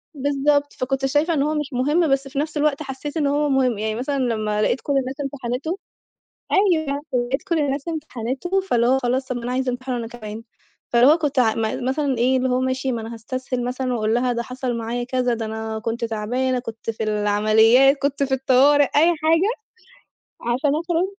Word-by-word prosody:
بالضبط، 285 Hz, +1 st, +1 dB
فكنت 270 Hz, +1 st, -2 dB
شايفة 295 Hz, +5 st, +1 dB
إن 295 Hz, -, +1 dB
هو 305 Hz, +1 st, 0 dB
مش 295 Hz, -2 st, -3 dB
مُهِم، 295 Hz, +7 st, +2 dB
بس 275 Hz, 0 st, +1 dB
في 275 Hz, +1 st, -4 dB
نفس 305 Hz, 0 st, -2 dB
الوقت 300 Hz, 0 st, +1 dB
حسّيت 285 Hz, +3 st, -6 dB
إن 295 Hz, -3 st, +1 dB
هو 290 Hz, +1 st, +1 dB
مُهِم، 260 Hz, -4 st, +2 dB
يعني 215 Hz, +1 st, -2 dB
مثلًا 265 Hz, +4 st, -2 dB
لمّا 215 Hz, -4 st, 0 dB
لقيت 245 Hz, -, +1 dB
كل 285 Hz, -, -2 dB
الناس 265 Hz, 0 st, -2 dB
امتحنته، 275 Hz, +4 st, -3 dB, 0.8 s
أيوه 315 Hz, -8 st, +2 dB
لقيت 250 Hz, +2 st, 0 dB
كل 340 Hz, -5 st, -1 dB
الناس 280 Hz, 0 st, -1 dB
امتحنته 305 Hz, +3 st, -2 dB
فاللي 255 Hz, -8 st, +2 dB
خلاص 250 Hz, +2 st, 0 dB
طب 255 Hz, -, -2 dB
ما 240 Hz, -, -5 dB
أنا 245 Hz, -, -2 dB
عايزة 260 Hz, 0 st, 0 dB
امتحنه 255 Hz, 0 st, -4 dB
أنا 235 Hz, -1 st, -4 dB
كمان، 225 Hz, -2 st, -8 dB, 0.5 s
فاللي 240 Hz, +1 st, +4 dB
هو 305 Hz, +4 st, +6 dB
كنت 295 Hz, -4 st, -1 dB
أ 225 Hz, -3 st, +4 dB, 0.3 s
مثلًا 270 Hz, -2 st, 0 dB
إيه 255 Hz, +3 st, +3 dB
اللي 260 Hz, 0 st, +1 dB
هو 250 Hz, 0 st, +1 dB
ماشي 260 Hz, 0 st, -1 dB
ما 235 Hz, -, -2 dB
أنا 225 Hz, +1 st, -7 dB
هاستسهل 255 Hz, +2 st, -4 dB
مثلًا 255 Hz, +1 st, -2 dB
وأقول 220 Hz, -2 st, 0 dB
لها 245 Hz, +1 st, +1 dB
ده 235 Hz, 0 st, -2 dB
حصل 250 Hz, 0 st, -4 dB
معايا 235 Hz, +1 st, -3 dB
كذا، 250 Hz, -1 st, 0 dB
ده 225 Hz, -1 st, -4 dB
أنا 220 Hz, 0 st, -4 dB
كنت 230 Hz, +2 st, -3 dB
تعبانة، 245 Hz, +4 st, -1 dB
كنت 230 Hz, -2 st, -5 dB
في 220 Hz, -, -5 dB
العمليات، 215 Hz, +5 st, +4 dB
كنت 280 Hz, 0 st, -1 dB
في 270 Hz, -1 st, +1 dB
الطوارئ 270 Hz, +2 st, +4 dB
أي 295 Hz, +4 st, +3 dB
حاجة، 325 Hz, +6 st, +2 dB, 0.9 s
علشان 250 Hz, +5 st, 0 dB
أخرج 335 Hz, +2 st, 0 dB
260 Hz, 195 wpm, -22 LUFS, 240-285 Hz, 0.9 s, هو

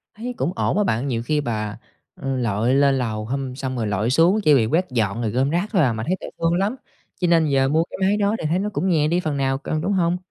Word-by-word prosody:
Thấy 245 Hz, +3 st, -5 dB
cũng 175 Hz, -, -1 dB
ổn -, -, 0 dB
á 210 Hz, -, +3 dB
bạn, 120 Hz, -, -1 dB
nhiều 115 Hz, -3 st, -2 dB
khi 150 Hz, +3 st, 0 dB
bà, 110 Hz, -5 st, -3 dB, 0.4 s
ừ, 135 Hz, -1 st, -3 dB
lội 115 Hz, +1 st, 0 dB
lên 140 Hz, -1 st, +3 dB
lầu 110 Hz, -4 st, -2 dB
hum 130 Hz, +1 st, -3 dB
xong 130 Hz, -1 st, -4 dB
rồi 110 Hz, -2 st, -1 dB
lội 105 Hz, +3 st, 0 dB
xuống 170 Hz, +10 st, +4 dB
chỉ 150 Hz, -, +5 dB
vì 120 Hz, -5 st, +4 dB
quét 170 Hz, +10 st, +1 dB
dọn 110 Hz, -2 st, 0 dB
rồi 110 Hz, -3 st, -1 dB
gom 130 Hz, +4 st, +1 dB
rác 175 Hz, +6 st, -1 dB
thôi 190 Hz, -6 st, +3 dB
à, 125 Hz, -5 st, +2 dB
mà 110 Hz, 0 st, -4 dB
thấy 185 Hz, -, +1 dB
thấy -, -, -7 dB
thương 165 Hz, 0 st, +1 dB
lắm, 200 Hz, +7 st, 0 dB, 0.4 s
cho 180 Hz, -, +1 dB
nên 165 Hz, -2 st, +4 dB
giờ 135 Hz, -2 st, +2 dB
mua 160 Hz, +2 st, +2 dB
cái -, -, -7 dB
máy 200 Hz, +2 st, +2 dB
đó 205 Hz, +1 st, +1 dB
thì -, -, -4 dB
thấy 175 Hz, +3 st, +1 dB
nó 210 Hz, +1 st, -1 dB
cũng 190 Hz, -2 st, -1 dB
nhẹ 155 Hz, -3 st, +2 dB
đi 175 Hz, +3 st, +1 dB
phần 155 Hz, -5 st, -2 dB
nào 135 Hz, 0 st, 0 dB
cân, 155 Hz, +2 st, -3 dB
đúng 200 Hz, +4 st, 0 dB
hông? 175 Hz, -1 st, +1 dB
140 Hz, 285 wpm, -22 LUFS, 120-175 Hz, 0.4 s, chỉ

